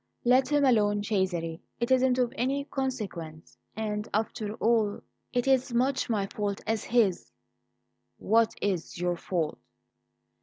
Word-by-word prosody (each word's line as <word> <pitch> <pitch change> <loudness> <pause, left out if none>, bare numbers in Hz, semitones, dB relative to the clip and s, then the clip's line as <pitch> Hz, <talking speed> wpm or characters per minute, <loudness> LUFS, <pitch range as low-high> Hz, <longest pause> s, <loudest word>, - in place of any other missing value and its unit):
"Let 255 +2 +4
him 290 -1 +4
alone, 205 -5 +3
Cesare; 180 -6 -1 0.2
it 235 +2 -1
isn't 260 -1 +4
of 245 -2 +1
any 270 +3 0
consequence, 200 - -5 0.2
and 210 0 -3
after 215 0 -2
all, 220 -3 +1 0.3
it's 245 +1 0
as 260 -2 +2
much 260 +2 +1
my 210 -4 +1
fault 200 0 -3
as 220 -1 -1
his." 220 -6 +1 0.9
"What 225 +1 +2
is 185 -5 -2
your 175 0 0
fault?" 170 -3 -2
220 Hz, 130 wpm, -28 LUFS, 195-250 Hz, 0.9 s, Let